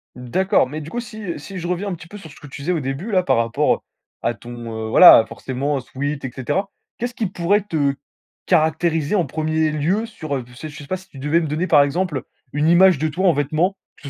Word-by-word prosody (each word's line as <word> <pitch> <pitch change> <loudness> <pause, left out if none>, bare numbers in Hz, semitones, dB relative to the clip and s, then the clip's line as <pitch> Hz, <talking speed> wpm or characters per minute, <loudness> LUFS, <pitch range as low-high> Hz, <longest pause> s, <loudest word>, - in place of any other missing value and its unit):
D'accord, 130 - +1
mais 155 +3 -6
du 155 - -8
coup, 240 - -3
si 215 -8 -6
si 190 +5 -8
je 175 - -4
reviens 180 +3 -2
un 195 - -2
petit 170 -1 -10
peu 205 - -10
sur 160 -6 -12
ce - - -15
que 145 - -11
tu 140 0 -9
disais 170 +6 -1
au 170 - 0
début 140 - -4
là, 185 -2 +4
par 180 - +1
rapport, 115 0 +2
heu, - - -9 0.5
à 120 - +1
ton, 115 -1 -7
heu, - - -5
voilà, 175 -4 +9
forcément, 135 +5 -3
sweat 140 +2 -4
et 130 - -4
cetera. 190 - -2 0.3
Qu'est-ce 245 +1 -3
qui 225 -3 -2
pourrait 185 +3 +1
te 155 -8 0 0.5
caractériser 160 0 +2
en 180 -5 +2
1er 155 +2 0
lieu, 175 +10 0
sur, 155 -10 -5
heu, 130 - -3
je 125 - -16
sais 155 - -7
je 145 - -12
sais 145 - -10
pas 185 - -2
si 190 +1 -17
tu 135 - -12
devais 150 +5 +2
me 165 - -2
donner, 155 +5 -1
par 145 -3 +6
exemple, 150 +1 -1
heu, - - -7 0.3
une 150 +2 +1
image 185 0 +6
de 155 +3 0
toi 185 +6 0
en 175 - +5
vêtements, 155 +7 0 0.2
que 140 - -9
155 Hz, 255 wpm, -21 LUFS, 140-185 Hz, 0.5 s, voilà